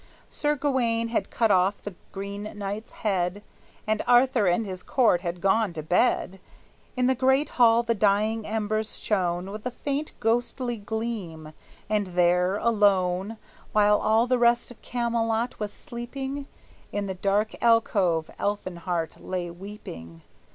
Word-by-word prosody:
Sir 295 Hz, 0 st, 0 dB
Gawayne 240 Hz, -5 st, 0 dB
had 215 Hz, -4 st, -1 dB
cut 225 Hz, -3 st, +2 dB
off 190 Hz, +2 st, +3 dB
the 205 Hz, -, -6 dB, 0.2 s
Green 200 Hz, +2 st, -6 dB
Knight's 205 Hz, +3 st, -5 dB
head, 190 Hz, 0 st, 0 dB, 0.4 s
And 215 Hz, 0 st, 0 dB
Arthur 245 Hz, -3 st, +4 dB
and 180 Hz, +6 st, +2 dB
his 185 Hz, -2 st, -5 dB
court 225 Hz, -9 st, +2 dB
had 175 Hz, 0 st, -4 dB
gone 195 Hz, 0 st, +2 dB
to 155 Hz, -2 st, -5 dB
bed; 190 Hz, +2 st, +1 dB, 0.6 s
In 250 Hz, -, +2 dB
the 260 Hz, -, +4 dB
great 265 Hz, +3 st, +2 dB
hall 235 Hz, -1 st, +4 dB
the 235 Hz, 0 st, +1 dB
dying 215 Hz, +1 st, +2 dB
embers 215 Hz, 0 st, -2 dB
shone 185 Hz, -2 st, -1 dB
With 210 Hz, +1 st, -7 dB
a 250 Hz, -, -1 dB
faint 285 Hz, +4 st, -3 dB
ghostly 240 Hz, +1 st, 0 dB
gleam, 200 Hz, -8 st, -5 dB, 0.3 s
and 210 Hz, -1 st, 0 dB
there, 180 Hz, +2 st, +3 dB
alone, 200 Hz, -2 st, +2 dB, 0.4 s
While 210 Hz, 0 st, +4 dB
all 220 Hz, +2 st, +3 dB
the 250 Hz, 0 st, +1 dB
rest 240 Hz, +1 st, +3 dB
of 245 Hz, -, -15 dB
Camelot 235 Hz, -1 st, -1 dB
was 210 Hz, -1 st, -3 dB
sleeping, 270 Hz, +4 st, -6 dB, 0.4 s
In 205 Hz, 0 st, -2 dB
the 190 Hz, -, -3 dB
dark 200 Hz, +3 st, 0 dB
alcove 200 Hz, -8 st, +2 dB
Elfinhart 175 Hz, -4 st, -3 dB
lay 180 Hz, -2 st, -3 dB
weeping. 125 Hz, -, -10 dB
210 Hz, 145 wpm, -26 LUFS, 190-235 Hz, 0.6 s, Arthur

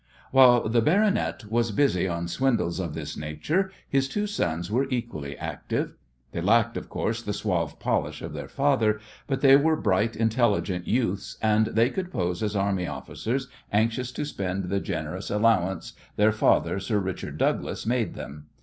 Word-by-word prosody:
While 125 Hz, -3 st, +6 dB
the 115 Hz, +1 st, +3 dB
"baronet" 195 Hz, -, +2 dB
was 115 Hz, 0 st, +2 dB
busy 105 Hz, -6 st, +2 dB
on 85 Hz, -1 st, -2 dB
swindles 110 Hz, -3 st, 0 dB
of 85 Hz, -5 st, -3 dB
this 75 Hz, -1 st, -5 dB
nature 150 Hz, -, -1 dB, 0.2 s
his 135 Hz, -1 st, +1 dB
two 210 Hz, +7 st, -1 dB
sons 85 Hz, -, -2 dB
were 135 Hz, +4 st, +1 dB
equally 80 Hz, -, -4 dB
active. -, -, -3 dB, 0.4 s
They 85 Hz, -, -3 dB
lacked, 115 Hz, +5 st, +3 dB
of -, -, -6 dB
course, 115 Hz, +1 st, -2 dB
the 105 Hz, -3 st, -3 dB
suave 95 Hz, -6 st, -2 dB
polish -, -, -1 dB
of -, -, -6 dB
their -, -, -6 dB
father, 125 Hz, -7 st, +2 dB, 0.3 s
but 135 Hz, -2 st, -1 dB
they 135 Hz, -1 st, +8 dB
were 155 Hz, +3 st, +4 dB
bright, 110 Hz, -3 st, +1 dB
intelligent 110 Hz, -5 st, +1 dB
youths, 110 Hz, -5 st, -1 dB
and 110 Hz, 0 st, +3 dB
they 115 Hz, +4 st, +2 dB
could 185 Hz, -1 st, -4 dB
pose 90 Hz, -, -1 dB
as 105 Hz, -1 st, -1 dB
army 95 Hz, -3 st, 0 dB
officers 130 Hz, +4 st, -3 dB, 0.2 s
anxious 115 Hz, +4 st, +1 dB
to 145 Hz, -, -3 dB
spend 95 Hz, -7 st, -3 dB
the 100 Hz, +1 st, +1 dB
generous -, -, -4 dB
allowance 105 Hz, -5 st, +1 dB, 0.2 s
their 105 Hz, +1 st, +4 dB
father, 110 Hz, -2 st, +2 dB
"Sir 105 Hz, +2 st, -1 dB
Richard 95 Hz, -2 st, -4 dB
Douglas," -, -, -1 dB
made 120 Hz, 0 st, 0 dB
them. 75 Hz, +1 st, -9 dB
110 Hz, 165 wpm, -26 LUFS, 95-125 Hz, 0.4 s, they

